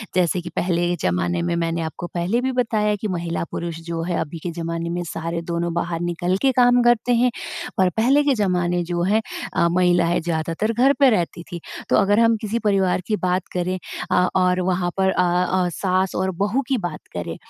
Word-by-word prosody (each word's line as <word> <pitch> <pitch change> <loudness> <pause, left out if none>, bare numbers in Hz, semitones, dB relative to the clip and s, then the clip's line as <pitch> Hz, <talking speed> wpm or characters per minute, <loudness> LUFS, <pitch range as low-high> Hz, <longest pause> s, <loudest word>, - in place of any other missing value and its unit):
जैसे 180 0 +2
कि 170 - -7
पहले 175 -1 +1
के 175 - +1
ज़माने 90 - 0
में 170 0 -1
मैंने 165 0 -1
आपको 160 +2 -5
पहले 180 +8 0
भी 260 +1 0
बताया 220 -4 +1
कि 215 - -1
महिला-पुरुष 170 -2 -3
जो 165 -1 -3
है, 175 0 -1
अभी 160 +2 -4
के 175 - -3
ज़माने 165 0 -4
में 175 +1 -2
सारे 165 +1 -3
दोनों 170 0 -2
बाहर 170 -1 -2
निकल 175 +2 -1
के 270 - +4
काम 245 0 +5
करते 240 0 +3
हैं, 245 +1 +3 0.5
और 185 -1 +4
पहले 270 +6 +4
के 285 - +3
ज़माने 180 -4 0
जो 175 -1 -1
हैं 210 +5 +2 0.3
अ, 170 - +3
महिलाएँ 175 -1 +2
ज़्यादातर 165 +5 -1
घर 260 +5 +4
पे 275 - +7
रहती 175 -5 -1
थीं। 175 - -5 0.3
तो - - +4
अगर 205 +2 +4
हम 230 0 +4
किसी 220 +1 -2
परिवार 190 -2 +2
की 215 - +1
बात 185 -2 -1
करें 180 +1 -1 0.3
अ, 180 0 +4
और 180 -1 +3
वहाँ 180 -1 0
पर 190 0 +3
अ 180 - +2 0.2
अ, 185 -1 +1
सास 185 0 0
और 190 +1 0
बहू 210 +7 +1
की 265 - +1
बात 175 -7 -4
करें - - -4
180 Hz, 205 wpm, -22 LUFS, 170-210 Hz, 0.5 s, पे